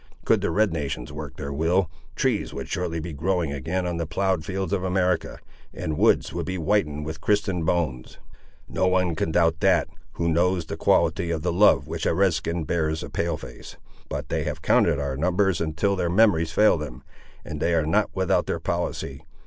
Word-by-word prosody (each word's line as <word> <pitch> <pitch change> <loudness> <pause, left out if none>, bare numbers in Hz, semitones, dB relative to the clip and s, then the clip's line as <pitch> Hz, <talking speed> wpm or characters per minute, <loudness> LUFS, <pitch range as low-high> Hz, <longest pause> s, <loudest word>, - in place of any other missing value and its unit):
Could - - +3
the - - 0
red 105 -3 +2
nations 70 -4 -4
work 75 -3 -7
their 70 0 -5
will, 85 +5 +2 0.3
trees - - 0
would - - -5
shortly 85 -2 -2
be 80 0 -6
growing 85 0 -1
again 85 +7 -2
on 85 -1 -2
the 85 -1 -2
ploughed 95 -1 0
fields 95 +3 -3
of 95 -2 0
America, 90 -1 0 0.4
and 80 - -3
woods - - +3
would 85 -1 -3
be 95 - -2
whitened 80 -5 0
with 80 0 -6
Christian 100 -4 +1
bones. 75 -7 -1 0.5
No 95 - 0
one 90 -2 +2
can 80 - -1
doubt 80 -1 +2
that, - - +3 0.2
who 85 - -1
knows 85 +1 +2
the 80 - -5
quality 85 - +2
of 80 -2 -2
the 90 -1 0
love 100 +4 +5
which - - -3
a - - +1
Red 95 -1 +3
skin 85 +1 -2
bears 80 0 -1
a - - -8
Pale - - -1
face; - - -11 0.3
but - - -4
they - - -1
have - - -4
counted - - +3
our 70 -2 -2
numbers 90 +4 +1
until 85 +5 0
their 90 -2 -1
memories 85 -4 +3
fail 105 0 +4
them, 70 -3 -7 0.4
and 75 - -6
they 85 +3 +1
are 80 -2 +2
not 100 +7 +2
without 95 -1 +1
their - - -1
policy. 70 -1 -3
85 Hz, 200 wpm, -25 LUFS, 80-95 Hz, 0.5 s, love